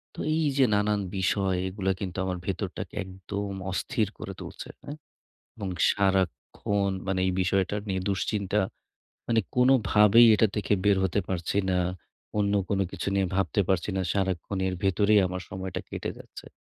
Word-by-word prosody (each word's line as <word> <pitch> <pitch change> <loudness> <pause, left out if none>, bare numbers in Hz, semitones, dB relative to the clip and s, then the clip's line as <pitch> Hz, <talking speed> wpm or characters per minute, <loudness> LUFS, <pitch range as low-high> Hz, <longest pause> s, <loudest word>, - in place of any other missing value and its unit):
তো - - -10 0.2
এই 160 - +1
যে 135 - +6
নানান 105 0 +1 0.2
বিষয় 95 0 +1
এগুলা 95 0 -1
কিন্তু 95 -3 -5
আমার 90 -1 -2
ভেতরটাকে 95 -1 -4
একদম 100 +2 -5 0.2
অস্থির 110 +3 -1
করে 95 - -6
তুলছে। - - -8
হ্যাঁ? 145 - -7 0.6
এবং 100 -4 -4 0.2
সারাক্ষণ 100 +1 0 0.2
মানে 95 -1 0
এই 95 - +1
বিষয়টা 95 +2 +1
নিয়ে 95 -1 -1
দুশ্চিন্তা, 100 +1 0 0.7
মানে 115 -1 +3 0.2
কোন 125 +1 +5 0.2
ভাবেই 105 +3 +7
এটা 110 - +4
থেকে 105 0 0
বের 100 -1 +5
হতে 95 +2 +1
পারছি 90 +1 -1
না। 90 - +2 0.6
অন্য 100 0 +2
কোন 100 - 0
কিছু - - -3
নিয়ে 95 -1 +2
ভাবতে 95 +1 +1
পারছি 95 +1 +1
না। 95 - +1
সারাক্ষণ 95 -1 -1
এর 95 - -2
ভেতরেই 100 +2 +4
আমার 90 0 -4
সময়টা 95 -1 -4
কেটে - - -4
যাচ্ছে। - - -12
100 Hz, 160 wpm, -27 LUFS, 95-105 Hz, 0.7 s, ভাবেই